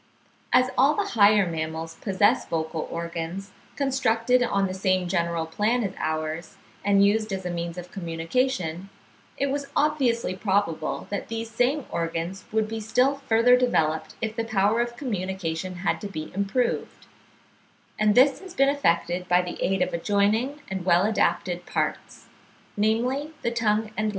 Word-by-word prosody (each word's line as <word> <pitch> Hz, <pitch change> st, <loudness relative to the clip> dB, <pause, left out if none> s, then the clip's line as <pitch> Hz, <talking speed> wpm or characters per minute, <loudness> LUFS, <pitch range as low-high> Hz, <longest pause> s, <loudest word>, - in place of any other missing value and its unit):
As 255 Hz, 0 st, +4 dB
all 275 Hz, +4 st, +5 dB
the 405 Hz, -1 st, -1 dB
higher 205 Hz, -2 st, +5 dB
mammals 160 Hz, -1 st, -4 dB
possess 195 Hz, 0 st, +2 dB
vocal 160 Hz, -1 st, -2 dB
organs, 170 Hz, +3 st, -5 dB, 0.2 s
constructed 250 Hz, -3 st, +2 dB
on 200 Hz, -5 st, +1 dB
the 185 Hz, -, -3 dB
same 185 Hz, -1 st, +1 dB
general 170 Hz, -2 st, 0 dB
plan 215 Hz, +9 st, 0 dB
as 195 Hz, -, -3 dB
ours, 155 Hz, +1 st, -3 dB, 0.3 s
and 200 Hz, 0 st, +4 dB
used 215 Hz, +1 st, +1 dB
as 190 Hz, -1 st, -3 dB
a 180 Hz, -, -2 dB
means 170 Hz, 0 st, -4 dB
of 180 Hz, 0 st, -8 dB
communication, 180 Hz, +1 st, -2 dB, 0.5 s
it 280 Hz, 0 st, 0 dB
was 280 Hz, 0 st, -2 dB
obviously 250 Hz, -10 st, +1 dB
probable 190 Hz, -5 st, -1 dB
that 200 Hz, -, -3 dB
these 225 Hz, 0 st, -5 dB
same 250 Hz, +5 st, +1 dB
organs 170 Hz, +3 st, -3 dB
would 220 Hz, -1 st, +1 dB
be 225 Hz, +1 st, -4 dB
still 250 Hz, +6 st, +2 dB
further 230 Hz, +2 st, +6 dB
developed 160 Hz, -11 st, +1 dB
if 220 Hz, -1 st, -2 dB
the 230 Hz, -, -1 dB
power 215 Hz, +1 st, +2 dB
of 240 Hz, 0 st, -3 dB
communication 185 Hz, -, -3 dB
had 180 Hz, -, -1 dB
to 205 Hz, -, -4 dB
be 155 Hz, -6 st, -7 dB
improved; 200 Hz, +6 st, -1 dB, 0.9 s
and 210 Hz, -1 st, +3 dB
this 270 Hz, +3 st, +5 dB
has 375 Hz, -2 st, -11 dB
been 275 Hz, 0 st, +4 dB
effected 180 Hz, -9 st, 0 dB
by 180 Hz, 0 st, +4 dB
the 180 Hz, -, -7 dB
aid 190 Hz, +1 st, +2 dB
of -, -, -4 dB
adjoining 210 Hz, -, +1 dB
and 190 Hz, -1 st, -4 dB
well 180 Hz, +1 st, +4 dB
adapted 180 Hz, -4 st, 0 dB
parts, -, -, -3 dB, 0.5 s
namely 245 Hz, +8 st, 0 dB
the 235 Hz, -, 0 dB
tongue 220 Hz, -2 st, 0 dB
and 215 Hz, +1 st, 0 dB
lips. -, -, +1 dB
200 Hz, 160 wpm, -25 LUFS, 175-235 Hz, 0.9 s, further